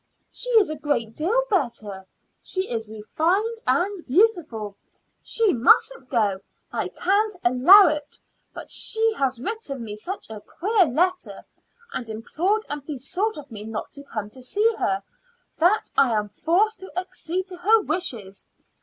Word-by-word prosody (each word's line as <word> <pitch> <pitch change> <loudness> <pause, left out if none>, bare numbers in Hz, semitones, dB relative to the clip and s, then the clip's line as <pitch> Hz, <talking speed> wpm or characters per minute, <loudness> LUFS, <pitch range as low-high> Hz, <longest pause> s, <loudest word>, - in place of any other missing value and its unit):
"She - - -3
is 405 -7 +4
a - - -3
great 285 -7 -2
deal 430 +11 +1
better. 220 - -2 0.3
She 375 0 -2
is 225 -2 -2
refined 345 - -1
and 375 0 +1
beautiful. 295 - +1 0.5
She 450 -4 +1
mustn't 255 - +3
go; 210 -6 +1 0.3
I - - -1
can't 410 +3 0
allow 265 +12 +8
it. 300 -2 -3 0.3
But - - -10
she 445 0 +2
has 265 -3 0
written 280 - -4
me 210 -2 -6
such 365 - -6
a 215 -1 -8
queer 400 - +1
letter, 365 +7 -1 0.5
and 235 - -5
implored 350 - -1
and 290 -1 -5
besought 330 - -2
of 285 -3 -10
me 210 -2 -7
not 220 0 -6
to 280 - -10
come 215 -7 -6
to 260 - -10
see 420 - +1
her, 195 0 0 0.6
that 360 +7 +2
I 270 - +4
am 210 -1 -1
forced 360 - +1
to 380 - -10
accede 365 0 -3
to 365 - -8
her 430 +6 +4
wishes. 250 - -3
310 Hz, 155 wpm, -24 LUFS, -, 0.6 s, allow